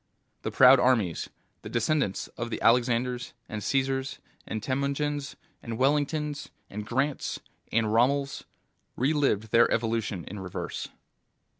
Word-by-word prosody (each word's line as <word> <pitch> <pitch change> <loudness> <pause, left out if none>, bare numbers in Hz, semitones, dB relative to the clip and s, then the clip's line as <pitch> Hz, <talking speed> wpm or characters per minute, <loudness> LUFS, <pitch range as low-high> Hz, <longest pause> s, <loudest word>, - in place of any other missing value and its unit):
The - - -2
proud 130 0 +7
armies, 110 -11 +2 0.3
the - - -8
descendents 120 -3 0
of 120 0 -5
the - - -3
Alexanders 125 +1 +2
and 105 -1 -5
Caesars 135 0 0 0.3
and 110 -1 -4
Temujins 140 +2 -1 0.3
and 115 -1 -5
Wellingtons 145 +2 0 0.2
and 105 +1 -6
Grants 135 +5 -1 0.3
and 115 0 +2
Rommels, 140 +4 +2 0.5
relived 130 -6 +1
their 115 0 +5
evolution 110 -5 -1
in 105 - -6
reverse. 90 -2 -5
125 Hz, 120 wpm, -28 LUFS, 115-140 Hz, 0.5 s, proud